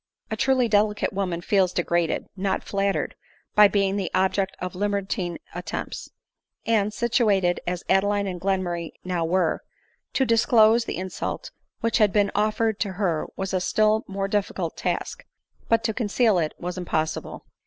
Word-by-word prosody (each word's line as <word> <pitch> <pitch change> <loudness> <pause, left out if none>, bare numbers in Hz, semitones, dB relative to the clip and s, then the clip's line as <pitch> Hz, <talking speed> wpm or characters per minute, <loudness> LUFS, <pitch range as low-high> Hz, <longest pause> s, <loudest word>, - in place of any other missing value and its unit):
A - - 0
truly 260 -2 +2
delicate 210 -1 +1
woman 185 -3 -2
feels 190 -1 +2
degraded, 175 -2 0
not 195 0 -1
flattered, 200 -1 -1 0.4
by 210 0 +8
being 195 0 +1
the 195 -3 -2
object 190 +1 +1
of 180 0 -5
libertine 200 -2 -2 0.2
attempts; - - -5 0.6
and, 215 -2 +2
situated 210 -6 +2
as 180 0 -2
Adeline 200 +1 +2
and 180 -3 -4
Glenmurray 180 -3 -1
now 180 -2 -1
were, 170 0 +1 0.5
to 265 - +2
disclose 230 -1 +4
the - - -4
insult 185 - -4 0.3
which 230 -1 +1
had 210 -2 +5
been 205 -1 +2
offered 215 +1 +1
to 200 -3 -1
her 180 -5 -1
was 190 0 -4
a* 185 - +1
still 215 +3 +2
more 195 0 -2
difficult 195 -4 -2
task; 485 +1 -3 0.5
but 230 0 +3
to 220 - 0
conceal 220 -2 +2
it 155 -2 -2
was 180 +1 -5
impossible. 160 -3 -3
195 Hz, 155 wpm, -25 LUFS, 180-215 Hz, 0.6 s, by